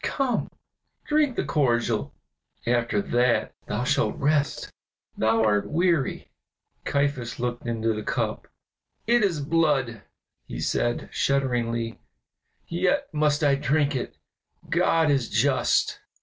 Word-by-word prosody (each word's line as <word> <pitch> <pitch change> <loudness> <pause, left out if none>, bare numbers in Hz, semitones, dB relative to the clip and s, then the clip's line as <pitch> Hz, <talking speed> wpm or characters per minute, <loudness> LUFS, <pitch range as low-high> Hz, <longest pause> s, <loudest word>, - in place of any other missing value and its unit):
Come, 265 -4 -1 0.6
drink 300 -4 +2
the - - -1
cordial, 120 - +1 0.5
after 120 -4 +1
that 120 0 +1
thou - - -2
shalt - - +1
rest; 145 0 0 0.4
thou 110 0 +2
art 105 -2 +1
weary." 170 -4 0 0.5
Caiaphas 140 -5 -1
looked 120 0 -3
into 115 -1 0
the 105 - -4
cup. - - -2 0.6
"It 240 +1 +3
is 170 -7 +1
blood," 140 -7 +1 0.5
he - - -6
said, 120 - -1
shudderingly, 120 -4 0 0.7
"yet 190 - 0
must 150 0 +1
I 145 -1 +4
drink 145 +2 +1
it; 125 - -4 0.5
God 160 -2 +3
is 135 -4 +1
just!" 130 +4 +1
135 Hz, 115 wpm, -25 LUFS, 115-155 Hz, 0.7 s, I